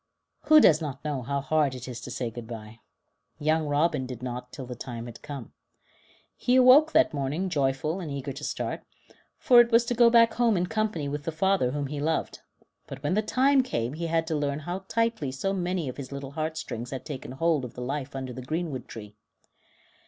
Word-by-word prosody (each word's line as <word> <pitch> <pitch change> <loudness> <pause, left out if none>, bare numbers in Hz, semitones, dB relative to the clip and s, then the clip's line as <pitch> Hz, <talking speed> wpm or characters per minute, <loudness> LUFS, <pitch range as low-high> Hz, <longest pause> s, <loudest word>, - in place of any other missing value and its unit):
Who 310 +1 +8
does 160 - +6
not 145 -2 -6
know 145 -3 -2
how 140 +3 -2
hard 145 -2 +1
it 125 0 -8
is 120 -2 -6
to - - -8
say 120 -3 -3
good 115 0 -8
bye? 110 -1 -9 0.6
Young 155 +1 +1
Robin 145 -2 +1
did 125 -1 -8
not 125 0 -5
till 135 - -7
the 125 - -6
time 120 -1 -7
had 120 -1 -10
come. 140 -6 -8 0.8
He 250 - +1
awoke 260 +5 +7
that 320 - +4
morning 145 +7 -2
joyful 145 +2 0
and 170 -5 -5
eager 140 -1 -4
to 145 +3 -9
start, - - -3 0.6
for 245 -1 +7
it 235 - +1
was 230 +1 +5
to 245 - -1
go 240 0 +6
back 230 -1 +5
home 230 -4 +2
in 175 - +1
company 215 -7 -1
with 145 +1 -4
the 165 - -1
father 190 -4 +2
whom 145 +2 -2
he 145 +1 -5
loved; 160 +2 -1 0.5
but 135 0 -9
when 145 - 0
the 215 - +2
time 265 +5 +3
came 125 - -2
he 165 +2 -3
had 165 0 +1
to 160 -1 -2
learn 145 0 -1
how 180 +5 -5
tightly 230 - 0
so 195 +9 -2
many 180 -4 -2
of 125 - -6
his 140 -2 -7
little 140 -1 -6
heartstrings 155 -6 -4
had 130 -2 -6
taken 130 -3 -6
hold 160 0 +1
of 125 - -8
the 125 - -7
life 135 +2 -4
under 130 -2 -5
the 130 - -7
greenwood 150 -2 -4
tree. 105 -2 -10
150 Hz, 215 wpm, -27 LUFS, 130-180 Hz, 0.8 s, Who